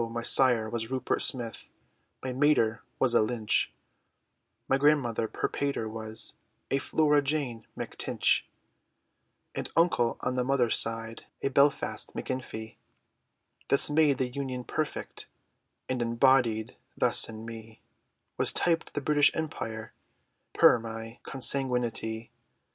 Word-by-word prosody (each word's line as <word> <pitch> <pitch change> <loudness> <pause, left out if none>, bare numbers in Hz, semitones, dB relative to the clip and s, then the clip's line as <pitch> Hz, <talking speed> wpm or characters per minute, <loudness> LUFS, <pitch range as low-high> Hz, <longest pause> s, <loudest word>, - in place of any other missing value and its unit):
my 115 0 -4
sire 120 -4 +4
was 115 0 -4
Rupert 130 -1 -1
Smith, 120 -3 0 0.5
My 130 -1 -3
mater 130 -5 +2 0.2
was 125 -2 +2
a 120 - +5
Lynch; 110 -1 0 1.0
My 135 - +3
grandmother 135 -6 +2
per - - -2
pater, 140 -5 -2
was 110 0 -2 0.4
A 135 - +2
Flora 150 +1 +2
Jane 135 -6 -3
Mac - - -6
Tinch, - - +1 1.1
An - - -4
uncle, 165 -8 +2
on 125 - -1
the 125 0 0
mother's 125 -3 +2
side, 115 0 -2 0.2
A - - +1
Belfast 140 +1 +2
Macinfee, 110 -4 -5 0.9
This 140 +1 +5
made 150 -3 +3
the 130 - 0
union 130 -1 -4
perfect, 155 +5 -4 0.6
And 130 -1 -2
embodied 115 -2 +2 0.2
thus - - +3
in 110 0 -8
me, 115 -1 -10 0.6
Was - - +3
typed 165 -2 +1
the 145 - -1
British 145 0 +4
Empire, 115 -8 -5 0.6
Per - - +6
my 115 +1 -8
consanguinitee. 125 -4 -1
125 Hz, 125 wpm, -28 LUFS, 115-140 Hz, 1.1 s, Per